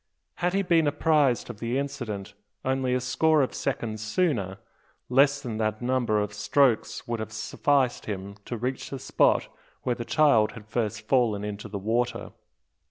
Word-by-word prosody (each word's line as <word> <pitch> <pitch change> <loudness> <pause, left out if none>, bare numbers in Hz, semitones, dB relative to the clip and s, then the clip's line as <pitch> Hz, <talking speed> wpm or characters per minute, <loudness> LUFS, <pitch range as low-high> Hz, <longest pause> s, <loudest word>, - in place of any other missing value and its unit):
Had 175 +1 0
he 195 - +2
been 165 -4 +3
apprised 145 -3 +2
of 105 - -14
the 120 +3 -1
accident 110 -8 -5 0.3
only 130 -1 +1
a - - +1
score 150 +5 +3
of 130 - -2
seconds 110 -2 -3
sooner, 110 - 0 0.5
less 140 +2 +4
than 120 -5 -5
that 110 -1 -1
number 120 -3 +1
of 105 0 -2
strokes 110 0 +1
would 120 -1 -2
have 110 0 -5
sufficed 125 +4 0
him 100 -1 -5
to 120 - -4
reach 125 +3 -3
the 135 - -5
spot - - +2 0.4
where 125 - +1
the 120 - -5
child 140 -6 +3
had 115 -3 -11
first 110 -1 -2
fallen 110 -3 +1
into 105 +1 -5
the 105 -1 -5
water. 115 +5 -1
120 Hz, 165 wpm, -27 LUFS, 110-135 Hz, 0.5 s, less